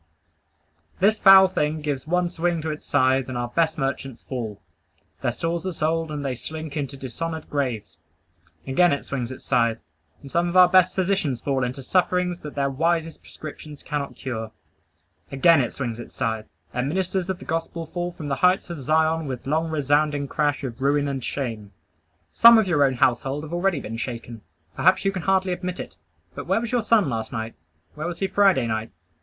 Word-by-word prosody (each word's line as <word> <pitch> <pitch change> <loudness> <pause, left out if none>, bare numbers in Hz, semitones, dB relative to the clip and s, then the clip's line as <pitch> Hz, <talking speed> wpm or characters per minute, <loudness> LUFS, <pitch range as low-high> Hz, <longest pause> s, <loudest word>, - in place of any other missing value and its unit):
This 210 +3 +3
foul 195 -1 +9
thing 155 -4 -1
gives 145 -1 -3
one 180 +1 +1
swing 175 0 0
to 160 - -2
its 150 - -8
scythe, 130 -1 +2
and 130 - -4
our 120 0 -2
best 160 +4 +1
merchants 135 -3 -3
fall; 115 -6 -5 0.6
their - - +1
stores 170 0 -2
are - - -1
sold, 160 0 -1
and 145 -2 -4
they 135 - -1
slink 155 +4 -7
into 140 -2 -3
dishonored 160 +5 -5
graves. 115 - -2 0.7
Again 155 +5 +3
it 140 - -3
swings 125 -4 -3
its 130 - -9
scythe, 115 -3 +2 0.5
and 140 - -10
some 175 +1 +1
of 180 - 0
our 180 -1 +9
best 185 0 +4
physicians 185 -9 0
fall 135 0 -1
into 125 +2 -4
sufferings 180 +2 +1
that 150 -3 -9
their 140 -1 +1
wisest 165 +3 0
prescriptions 150 -1 -10
cannot 145 -2 -4
cure. 110 -4 -5 0.8
Again 145 +3 +5
it 125 - -2
swings 120 -4 -4
its 120 - -10
scythe, 110 -3 -2 0.3
and 125 +2 -1
ministers 185 +2 -1
of 190 - -1
the - - -12
gospel 165 0 -3
fall 175 +2 -4
from 160 -3 -8
the 140 -2 -1
heights 180 +3 +2
of 170 - -6
Zion 160 +2 +1
with 130 -2 -5
long 160 +4 0
resounding 145 -1 +1
crash 145 +1 0
of 125 -2 -6
ruin 145 +1 +2
and 135 -3 -3
shame. 110 -7 -4 0.6
Some 235 0 +8
of 220 - +4
your 160 -6 +3
own 135 -2 +2
household 135 +4 +1
have 155 +1 -8
already 175 -2 +1
been 115 -3 -6
shaken. 115 -2 -6 0.3
Perhaps - - +3
you 195 - +3
can 190 -2 -4
hardly 190 0 +1
admit 180 0 -5
it; - - -7 0.4
but - - -7
where - - +2
was 235 0 -4
your 245 -1 +2
son 215 -5 +3
last 110 -3 -3
night? 115 -3 -4 0.4
Where 155 +2 -4
was 175 -1 -4
he 195 - -1
Friday 195 -9 +3
night? 110 0 -2
150 Hz, 195 wpm, -24 LUFS, 130-175 Hz, 0.8 s, foul